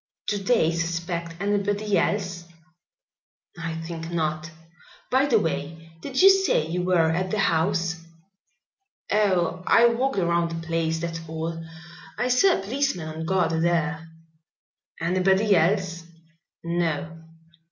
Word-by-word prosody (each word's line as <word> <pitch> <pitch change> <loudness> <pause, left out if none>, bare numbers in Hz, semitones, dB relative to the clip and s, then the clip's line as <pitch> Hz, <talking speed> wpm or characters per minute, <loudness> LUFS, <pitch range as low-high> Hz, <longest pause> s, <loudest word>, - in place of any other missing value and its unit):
"Do 205 - 0
they 195 -5 +2
suspect 170 0 -3
anybody 205 +1 0
else?" 180 -5 -1 1.1
"I 170 -1 -5
think 165 0 -6
not. 155 -1 -2 0.6
By 265 +2 +3
the 240 -5 +4
way, 165 -2 -3
did 265 +3 -4
you 390 - +10
say 385 - +2
you 175 +3 -2
were 175 -3 +2
at 185 +3 -1
the 215 - -1
house?" 170 -2 0 1.1
"Oh, 185 -4 +1
I 235 - +6
walked 255 +1 -1
around 170 -2 +1
the 165 -1 -6
place, 165 -1 0
that's 165 0 -4
all. 165 +1 -4 0.5
I 250 - 0
saw 365 +10 +4
a 195 - -6
policeman 225 - -2
on 160 +1 -6
guard 185 -2 +1
there." 165 -1 0 0.9
"Anybody 190 +4 +2
else?" 170 -1 +1 0.6
"No." 165 -1 -2
170 Hz, 125 wpm, -25 LUFS, 165-200 Hz, 1.1 s, you